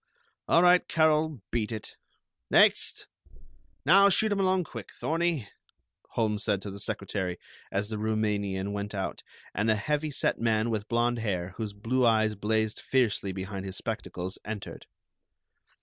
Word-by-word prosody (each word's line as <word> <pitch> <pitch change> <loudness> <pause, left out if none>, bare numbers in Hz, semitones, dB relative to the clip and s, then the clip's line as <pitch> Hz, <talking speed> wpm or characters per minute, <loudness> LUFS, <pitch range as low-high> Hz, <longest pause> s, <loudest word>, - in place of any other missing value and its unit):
All 170 - +5
right, 180 0 +5
Carol, 155 -5 +2
beat 115 -1 -1
it. 110 -2 -6 0.5
Next! - - +4 0.8
Now 195 +6 +7
shoot 215 +2 +2
'em 200 - +1
along 185 -1 +2
quick, - - -9
Thorney," 165 -7 0 0.7
Holmes 105 -2 0
said 100 -3 +1
to 100 - -5
the 100 - -8
secretary, 95 -3 -2 0.3
as 100 +2 -1
the 110 -1 -3
Roumanian 105 -3 -1
went 100 0 -4
out, 95 - -3 0.3
and 105 +2 0
a 110 - +5
heavy 150 +8 -1
set 140 - 0
man 115 0 +2
with 105 -1 -2
blond 120 +1 +1
hair, 95 -5 -2
whose 110 -3 -4
blue 115 +6 0
eyes 110 -2 +4
blazed 110 +1 0
fiercely 115 -6 +1
behind 95 +1 -5
his 95 -1 -6
spectacles, 90 +2 -4
entered. 105 -2 -7
110 Hz, 150 wpm, -28 LUFS, 100-130 Hz, 0.8 s, Now